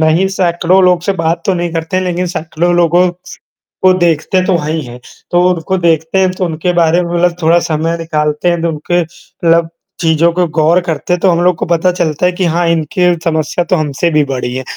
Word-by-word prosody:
नहीं 160 +4 +2
सैकड़ों 180 +1 +2
लोग 180 -1 +3
से 200 - 0
बात 165 -2 -1
तो 190 - +2
नहीं 175 -1 -3
करते 165 +2 -3
हैं, 185 - 0
लेकिन 180 0 -2
सैकड़ों 170 0 -2
लोगों, 175 +1 +3 0.7
को 185 0 +5
देखते 175 +1 +1
तो 185 -2 +2
हैं 155 -1 -3
ही 160 - -2
हैं। 120 +1 -10 0.3
तो 175 - +3
उनको 175 +3 -2
देखते 165 0 0
हैं 185 -1 +2
तो 185 - -1
उनके 170 +1 -2
बारे 170 0 +2
में 175 0 -4
मतलब 175 0 +1
थोड़ा 165 +2 +4
समय 165 +2 -1
निकालते 155 0 -1
हैं 170 -1 -1
तो 170 - 0
उनके 165 +3 -1
मतलब 165 0 -1 0.3
चीज़ों 165 0 +2
को 180 +1 0
गौर 165 +2 +3
करते 165 +1 -1
तो 190 - +2
हम 170 -1 +1
लोग 180 0 +3
को - - -2
पता 170 +2 +1
चलता 170 -2 -1
है 180 - +3
कि 180 +1 -2
हाँ, 170 +1 0
इनकी 170 +2 +1
समस्या 160 +1 -1
तो - - +3
हमसे 155 +1 -1
भी 150 -1 +3
बड़ी 125 -2 -4
है। 130 - -4
170 Hz, 220 wpm, -13 LUFS, 160-180 Hz, 0.7 s, को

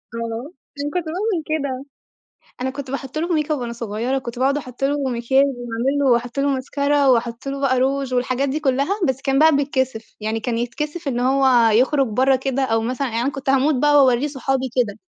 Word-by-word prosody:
آه، 230 +6 -5 0.3
عشان 290 +1 -2
كنت 355 -2 -1
باعمل 360 +1 -2
كده، 280 -4 -3 0.8
أنا 260 +1 -1
كنت 275 -1 -7
باحط 275 +1 -5
له 335 +3 -1
ميك 305 0 -1
أب 295 - 0
وأنا 240 -1 -4
صغيّرة 235 +3 -2
كنت 240 -1 -7
باقعُد 275 +2 +2
احط 255 -1 -6
له 290 +1 +1
مكياج 250 +3 +2
واعمل 245 +1 -2
له 280 - +2
واحط 240 +2 0
له 280 +1 +2
ماسكارا 280 +1 +1
واحط 235 0 +1
له 275 0 -4
بقى 260 -2 +2
روج 270 0 0
والحاجات 255 +2 0
دي 300 +3 -2
كلّها، 280 +9 0
بس 265 0 -1
كان 270 -1 +1
بقى 315 -1 +6
بيتكسف 260 -5 -2
يعني 220 +1 -2
كان 230 0 -2
يتكسف 295 +6 -4
إن 245 -2 -1
هو 255 -3 +4
يخرج 265 +4 +3
برّا 260 +4 +2
كده 270 +1 -2
أو 225 -3 +1
مثلًا 255 +3 -2
يعن 230 0 -2
أنا 270 +4 0
كنت 275 -1 -2
هاموت 275 +3 +3
بقى 295 +3 +3
واورّيه 255 +2 +2
صحابي 265 -1 -1
وكده، 210 -5 0
265 Hz, 205 wpm, -21 LUFS, 245-280 Hz, 0.8 s, بقى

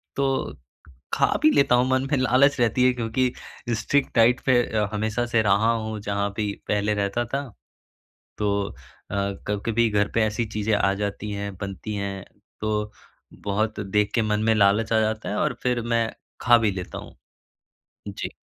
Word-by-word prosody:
तो 135 -1 -1 0.6
खा - - +4 0.2
भी 155 - +7
लेता 140 -3 +4
हूँ 125 +1 +3
मन 130 +1 +1
में 145 - +3
लालच 130 +3 +3
रहती 120 +1 +2
है 130 - +4
क्योंकि 125 +1 0 0.5
स्ट्रिक्ट 140 +2 0
डाइट 120 +1 +5
पे 130 - +4 0.4
हमेशा 110 +3 -1
से 115 - +5
रहा 105 +2 +3
हूँ 110 -1 -3
जहाँ 100 0 0
भी 105 -2 -1 0.2
पहले 105 0 +1
रहता 105 +3 -1
था। 135 +4 -3 0.9
तो 105 -1 0 0.2
अ, - - -12 0.4
कभी-कभी 105 +3 -1
घर 105 -1 +2
पे 115 - +3
ऐसी 110 +2 -1
चीज़ें 110 0 -2
आ 100 -1 +2
जाती 105 +1 -4
हैं, 100 -1 -4
बनती 100 +2 -5
हैं 100 -1 -4 0.4
तो 105 0 -1 0.6
बहुत 105 +2 0 0.2
देख 105 0 +2
के 115 - +3
मन 105 0 +1
में 110 - +4
लालच 105 +2 +3
आ 110 - +4
जाता 110 0 -2
है 105 - -2
और - - +1
फिर 125 -1 +1
मैं 115 -1 +2 0.3
खा 120 -1 +6
भी 110 -3 +1
लेता 95 -2 -6
हूँ। - - -10 0.9
जी। - - -5
110 Hz, 170 wpm, -24 LUFS, 105-120 Hz, 0.9 s, भी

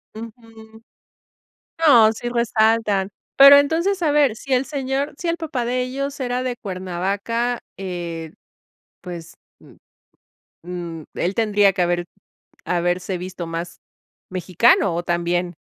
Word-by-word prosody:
Ujú. 225 -1 -12 1.0
No, 235 -7 +7
sí 240 +2 -5
resaltan. 220 -4 +1 0.3
Pero, 275 +1 +10
entonces, 335 +7 +1
a 300 - +2
ver, 290 -6 +3
si 265 +3 -4
el 255 +1 +2
señor 275 0 -3
si 350 - -5
el 335 0 0
papá 295 -7 -3
de 250 +1 -1
ellos 275 +3 -4
era 250 -1 -2
de 255 -1 -2
Cuernavaca 200 +5 -3 0.2
eh, 170 -4 -6 0.7
pues, 170 -2 -9 0.3
mm, - - -18 0.9
mm, 170 -2 -6
él 185 +3 -1
tendría 205 -3 +3
que 180 - -1
haber 175 0 0 0.6
haberse 180 +1 -1
visto 180 -1 -6
más 165 +1 -6 0.5
mexicano 185 +1 +2
o 170 - -2
también 175 +1 -1
220 Hz, 125 wpm, -21 LUFS, 180-255 Hz, 1.0 s, Pero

